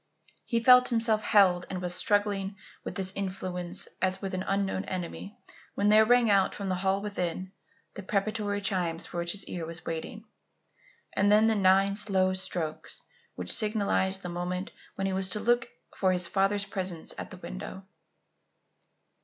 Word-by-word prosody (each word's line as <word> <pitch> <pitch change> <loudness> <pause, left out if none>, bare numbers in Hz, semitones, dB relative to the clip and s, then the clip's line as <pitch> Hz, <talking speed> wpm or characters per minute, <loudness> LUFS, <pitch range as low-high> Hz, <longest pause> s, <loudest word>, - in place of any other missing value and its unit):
He 230 -1 -1
felt 250 0 +7
himself 225 -2 +2
held 185 -4 +4
and 185 - -4
was 180 -1 -1
struggling 200 +1 +1 0.3
with - - -6
this 190 0 -2
influence 185 -2 -2
as 185 0 +1
with 195 -1 -5
an 185 - -2
unknown 195 -1 0
enemy 185 +3 -6 0.4
when 205 +1 +2
there 215 +1 +7
rang 245 +1 +4
out, 195 -2 +3
from 200 -2 -4
the - - +1
hall 195 +1 +1
within, 185 -2 -3 0.4
the - - -7
preparatory 205 +1 -1
chimes 180 -5 -1
for 175 - -8
which 170 0 -2
his 200 -1 -1
ear 175 - -5
was 165 +1 -6
waiting, 165 +7 -5 0.9
and 205 +1 +3
then 215 +1 +6
the 225 - +4
nine 195 -1 +4
slow 190 -3 +1
strokes 180 -4 -3 0.3
which 90 0 -2
signalized 200 -3 +1
the 180 - -4
moment 180 +2 -4 0.2
when 195 - -2
he 195 - -1
was 190 0 0
to 210 - 0
look 240 +2 +1 0.3
for 190 -1 +2
his 180 -1 0
father's 195 +2 +1
presence 185 -4 -4
at - - -6
the - - -10
window. 125 - -8
195 Hz, 170 wpm, -28 LUFS, 185-205 Hz, 0.9 s, felt